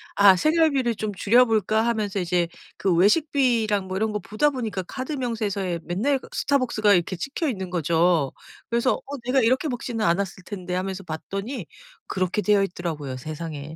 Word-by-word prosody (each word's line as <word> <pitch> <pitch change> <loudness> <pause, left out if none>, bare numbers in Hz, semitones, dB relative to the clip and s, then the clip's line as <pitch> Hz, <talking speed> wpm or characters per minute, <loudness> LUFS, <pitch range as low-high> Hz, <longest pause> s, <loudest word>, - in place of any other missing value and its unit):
'아 200 -2 +7
생활비를 305 - +2
좀 210 0 -3
줄여볼까.' 220 0 +3
하면서 215 -4 -1
이제 175 -1 +1 0.3
그 190 -3 +1
외식비랑 220 - +2
뭐 185 - -2
이런 215 +1 0
거 210 - -1
보다 215 +10 +1
보니까 225 -8 -3
카드 260 - -6
명세서에 210 -9 -2
맨날 220 - 0
그 - - -14
스타벅스가 235 -7 +2
이렇게 180 +1 +1
찍혀 285 - -2
있는 190 -7 -4
거죠. 170 -3 +2 0.4
그래서 235 +2 +2
어 285 +1 -6
내가 260 +2 +3
이렇게 255 +6 +2
먹지는 240 -4 -2
않았을 185 +1 0
텐데 185 -3 -5
하면서 190 +1 -3
봤더니 195 - -5 0.4
그렇게 185 +2 -1
되어 205 -1 +3
있더라고요. 160 -8 -4
세상에. 155 +1 -6
205 Hz, 385 characters per minute, -24 LUFS, 180-245 Hz, 0.4 s, 아